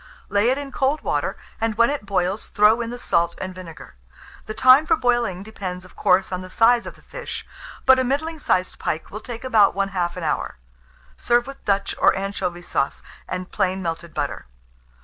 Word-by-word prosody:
Lay 205 +3 +3
it 260 - +2
in 285 -1 -6
cold 275 +3 0
water, - - -1 0.2
and 225 -1 0
when 235 +4 +4
it 280 -8 -4
boils, 190 +1 -1
throw 215 +3 +4
in 230 - -3
the 245 - -5
salt 170 -7 +1
and 185 0 -5
vinegar. 165 -5 -11 0.5
The 215 - -5
time 260 +6 +6
for 325 - +5
boiling 240 - 0
depends, 185 -4 -6
of 185 - -17
course, 190 +1 +2
on 185 0 -2
the 185 - -9
size 230 +4 +4
of - - -8
the - - -21
fish; - - -7 0.4
but 265 0 +7
a - - +2
middling 310 +5 -1
sized 185 -10 0
pike 160 - -3
will 215 - -5
take 235 +1 -7
about 215 -7 +4
1/2 190 -3 -1
an 180 - -5
hour. 155 - -2 0.6
Serve 240 0 +2
with 275 0 -10
Dutch 200 -1 +1
or - - +5
anchovy 190 -3 -3
sauce, 140 - -2 0.2
and 185 0 -5
plain 190 -2 0
melted 165 0 -4
butter. - - -3
205 Hz, 195 wpm, -23 LUFS, 185-245 Hz, 0.6 s, but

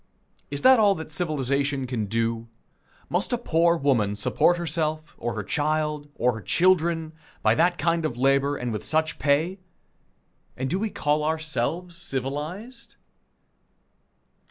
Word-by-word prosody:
Is 140 0 -5
that 260 -2 +7
all 205 -2 +5
that 160 -2 -8
civilization 140 -4 0
can 120 -5 -3
do? 115 +1 -1 0.6
Must 180 +3 -1
a - - +2
poor 170 -6 +2
woman 120 -9 +1
support 175 +10 +2
herself, 155 -1 -2
or 120 -1 -3
her 105 - -3
child, 150 +3 -1
or 125 +1 +2
her 110 - -7
children, 165 - +2 0.3
by - - +5
that 175 +2 +2
kind 165 +1 +1
of 130 -6 -2
labor, 140 +2 +2
and 125 -2 -3
with 105 - -4
such 155 +1 0
pay 155 +7 +1 1.0
and 130 +1 -3
do 185 - 0
we 220 +1 -1
call 150 -4 0
ourselves 160 +2 -2
civilized? 170 - -5
155 Hz, 140 wpm, -25 LUFS, 135-170 Hz, 1.0 s, that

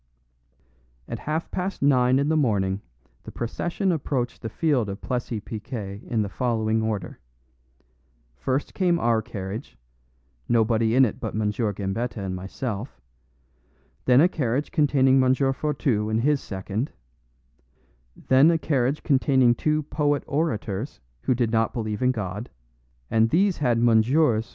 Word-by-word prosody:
At - - -5
half 160 +2 -2
past 185 -3 -3
nine 130 -2 +4
in 140 +1 +1
the 160 - +2
morning 100 -9 +1 0.4
the - - -10
procession 175 - -2
approached 135 -6 -2
the 110 - -4
field 130 -5 0
of 100 - -5
Plessis 120 -3 -3
Piquet 105 -2 -6
in 110 -3 0
the - - -3
following 110 0 0
order: 105 -5 -3 1.2
first 130 - -2
came 180 -3 +2
our 115 -7 +2
carriage 110 +1 -7 0.7
nobody 115 0 +2
in 130 0 +6
it 110 - -4
but - - -4
M. 105 -1 0
Gambetta 105 +1 -2
and 95 -2 -3
myself; 105 - -5 1.1
then 125 +2 +6
a 170 - +6
carriage 140 -4 -2
containing 135 -3 +4
M. 130 0 +4
Fourtou 135 -5 0
and 110 +1 +1
his 145 +2 +2
second; 100 +6 -4 1.3
then 135 +4 +6
a 170 - +3
carriage 140 -2 0
containing 130 -3 +4
two 155 +4 0
poet 145 0 0
orators 135 -6 -2 0.2
who 130 - +1
did 120 -2 0
not 115 -1 +1
believe 110 -4 -3
in 125 - +3
God, 105 0 -5 0.6
and 115 0 +3
these 190 - +2
had 125 -5 +1
MS. 115 +2 +3
120 Hz, 140 wpm, -25 LUFS, 110-140 Hz, 1.3 s, in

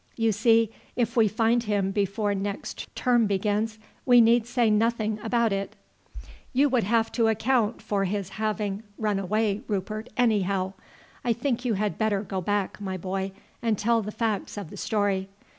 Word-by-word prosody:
You 225 -1 +2
see, 225 +1 +3 0.2
if 235 -2 0
we 225 -3 +5
find 225 +3 +2
him 200 -2 0
before 205 +1 0
next 200 +1 -4
term 240 -4 +3
begins, 210 +2 0 0.3
we 245 -2 +6
need 230 0 +5
say 245 -1 +2
nothing 220 0 +1
about 230 -1 +1
it." 195 0 -3 0.8
"You 280 +3 +4
would 250 -5 +2
have 225 +2 +2
to 230 -2 +2
account 225 0 +1
for 205 -2 0
his 195 0 -2
having 210 -1 -2 0.2
run 210 -3 0
away, 210 +2 0
Rupert, 215 +2 -3
anyhow. 200 -5 +1 0.5
I 235 - +2
think 245 +1 -2
you 230 -4 +1
had 205 +1 -2
better 215 -2 +1
go 190 -2 -3
back, 205 +2 -1
my 190 -2 -3
boy, 190 +2 -3 0.3
and 225 -3 +1
tell 230 +3 +2
the 210 0 -5
facts 215 -3 -2
of 195 -6 -6
the - - -8
story. 200 -3 0
215 Hz, 170 wpm, -26 LUFS, 200-230 Hz, 0.8 s, we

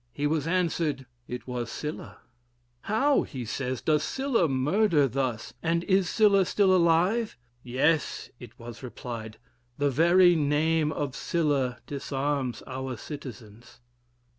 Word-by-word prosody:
He 145 - -3
was 155 0 0
answered, 165 -6 0 0.2
it 125 0 -6
was 125 -2 -4
Sylla: 150 +1 -6 0.7
'How,' 270 +7 +2 0.2
says 130 +2 -3
he, - - -32
'does 155 -2 +3
Sylla 265 - +1
murder 150 +3 +2
thus, 130 -3 -3
and 170 +1 0
is 190 -2 +2
Sylla 205 -3 +4
still 190 0 +3
alive?' 180 - +2 0.2
'Yes,' 140 +6 0
it 120 -2 -12
was 115 0 -10
replied, 115 -4 -7 0.4
'the 145 -1 +1
very 175 +5 +5
name 155 +1 +2
of 140 -3 -3
Sylla 145 -7 0
disarms 140 -2 -2
our 130 -1 -5
citizens.' 120 -5 -10
145 Hz, 125 wpm, -27 LUFS, 130-170 Hz, 0.7 s, very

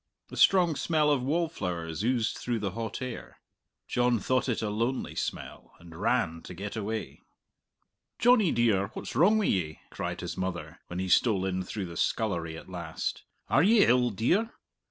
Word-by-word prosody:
A - - -7
strong 175 -5 +5
smell 150 0 +2
of 140 -3 +2
wallflowers 100 - -2
oozed 120 -1 +1
through 120 -1 -2
the 100 -3 -2
hot 115 +4 -4
air. 125 -2 -7 0.5
John 125 -1 +2
thought 130 +5 0
it 115 - -1
a 105 - -1
lonely 115 +5 -1
smell, - - -5
and 85 -1 -13
ran 95 -4 0
to 90 - -9
get 100 +4 -6
away. 110 0 -4 1.0
"Johnny 230 -6 +5
dear, 110 -5 +2
what's - - -6
wrong 190 - +5
wi' 215 - +1
ye?" 80 - 0
cried - - -4
his - - -4
mother, 85 -3 -4
when 90 - -6
he 95 +1 -2
stole 95 0 +3
in 95 -1 -1
through 95 +2 -4
the 85 -1 -8
scullery 85 -7 -1
at - - -11
last. 85 -3 -4 0.2
"Are 135 - +4
ye 205 +4 +6
ill, 125 0 +4
dear?" 175 - +1
110 Hz, 175 wpm, -29 LUFS, 90-130 Hz, 1.0 s, ye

